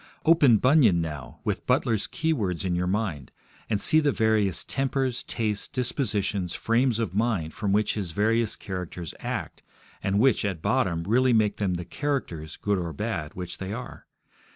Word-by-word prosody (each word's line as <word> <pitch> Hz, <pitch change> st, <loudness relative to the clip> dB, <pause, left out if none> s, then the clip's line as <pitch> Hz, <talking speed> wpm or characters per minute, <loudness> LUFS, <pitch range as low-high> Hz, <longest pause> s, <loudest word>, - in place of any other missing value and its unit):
Open 150 Hz, -8 st, +6 dB
Bunyan 125 Hz, -, +4 dB
now, 75 Hz, -5 st, -6 dB
with -, -, -3 dB
Butler's 110 Hz, -3 st, +1 dB
keywords 110 Hz, -, -1 dB
in 90 Hz, -, 0 dB
your 90 Hz, +1 st, 0 dB
mind, 90 Hz, -, -2 dB, 0.4 s
and 105 Hz, -3 st, +1 dB
see 155 Hz, -, +5 dB
the 150 Hz, -2 st, +2 dB
various 110 Hz, -5 st, +1 dB
tempers, 135 Hz, -2 st, -1 dB
tastes, 105 Hz, -3 st, -2 dB
dispositions, 105 Hz, -, -1 dB
frames 115 Hz, +1 st, +1 dB
of 110 Hz, -7 st, -2 dB
mind 105 Hz, -7 st, 0 dB
from 100 Hz, -1 st, -2 dB
which 105 Hz, +2 st, +2 dB
his 100 Hz, -5 st, -3 dB
various 110 Hz, +5 st, +1 dB
characters 90 Hz, -4 st, -6 dB
act, -, -, -4 dB, 0.4 s
and 95 Hz, +1 st, 0 dB
which, 125 Hz, +2 st, +3 dB
at 95 Hz, -5 st, -2 dB
bottom, 85 Hz, +1 st, 0 dB
really 125 Hz, +6 st, +3 dB
make 105 Hz, -2 st, +2 dB
them 95 Hz, -3 st, 0 dB
the 85 Hz, 0 st, -5 dB
characters, 85 Hz, -, -3 dB
good 100 Hz, -2 st, 0 dB
or 85 Hz, -2 st, -3 dB
bad, 75 Hz, +2 st, -4 dB
which 90 Hz, -1 st, -6 dB
they 95 Hz, +1 st, -4 dB
are. 125 Hz, +2 st, -8 dB
105 Hz, 165 wpm, -26 LUFS, 90-120 Hz, 0.4 s, Open